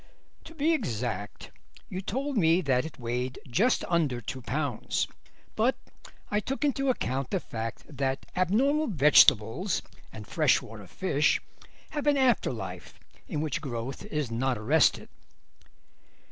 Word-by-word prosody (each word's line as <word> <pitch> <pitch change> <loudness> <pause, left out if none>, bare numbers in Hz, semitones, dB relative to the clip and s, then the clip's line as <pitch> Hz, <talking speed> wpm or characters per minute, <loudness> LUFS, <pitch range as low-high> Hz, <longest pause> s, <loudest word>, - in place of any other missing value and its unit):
"To 325 - -12
be 320 +2 +2
exact 110 - -3 0.4
you 185 - -5
told 270 +8 -3
me 170 -3 +4
that 130 -4 +1
it 160 - -8
weighed 125 +2 -3
just 205 - +2
under 155 -8 +1
two 125 +3 -6
pounds, 135 0 -1 0.5
but 235 +4 +2 0.6
I 210 - +2
took 270 +7 -2
into 275 -1 +1
account 135 - -1
the 190 - 0
fact 115 -7 -6
that 135 -2 -2
abnormal 265 - +2
vegetables 145 - +4 0.3
and - - -9
freshwater - - 0
fish - - +1 0.5
have 295 -1 -3
an 290 -1 +4
after 260 -3 +3
life, - - -7 0.3
in 150 -6 -2
which 155 -2 -2
growth 130 -2 -5
is 150 -6 -3
not 125 +1 0
arrested." 110 - +3
150 Hz, 130 wpm, -28 LUFS, -, 0.6 s, me